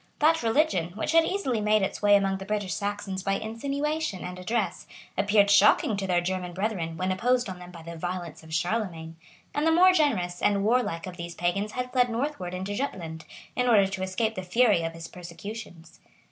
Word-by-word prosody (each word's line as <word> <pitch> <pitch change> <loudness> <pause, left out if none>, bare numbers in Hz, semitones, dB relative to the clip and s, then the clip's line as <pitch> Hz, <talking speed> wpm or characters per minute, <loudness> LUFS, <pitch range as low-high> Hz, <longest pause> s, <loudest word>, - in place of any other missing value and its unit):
That 320 +2 +3
religion, 225 - +1
which 220 - -2
had 330 0 +5
easily 265 - -1
made 210 -1 +3
its 195 - -3
way 205 -1 +6
among 195 -1 +1
the - - -6
British 205 -3 -2
Saxons 200 +1 -3
by 195 +1 0
insinuation 275 - -2
and 180 0 -6
address, 215 +4 -2 0.3
appeared 205 +1 +3
shocking 205 +1 +5
to 195 -1 -3
their 175 -1 +2
German 180 0 -3
brethren, 180 -4 -2
when 185 +2 -1
imposed 245 +5 +1
on 185 -2 -7
them 180 0 -10
by 170 -2 -11
the 170 +1 -8
violence 175 -1 -5
of 160 0 -14
Charlemagne; 165 -1 -2 0.4
and 295 +2 +1
the - - +5
more 365 +3 +7
generous 205 - +1
and 200 -1 +2
warlike 220 -7 +1
of 180 -1 -8
these 170 -1 -6
pagans 195 +4 -1
had 250 0 -3
fled 250 -1 +3
northward 230 -7 -3
into 190 +2 -4
Jutland, 170 -10 -4 0.3
in 250 0 +1
order 210 -5 +6
to 190 0 -4
escape 190 +4 -1
the 185 - -4
fury 205 0 +3
of 165 0 -3
his 165 0 -8
persecutions. 175 -1 -9
195 Hz, 200 wpm, -27 LUFS, 180-230 Hz, 0.4 s, more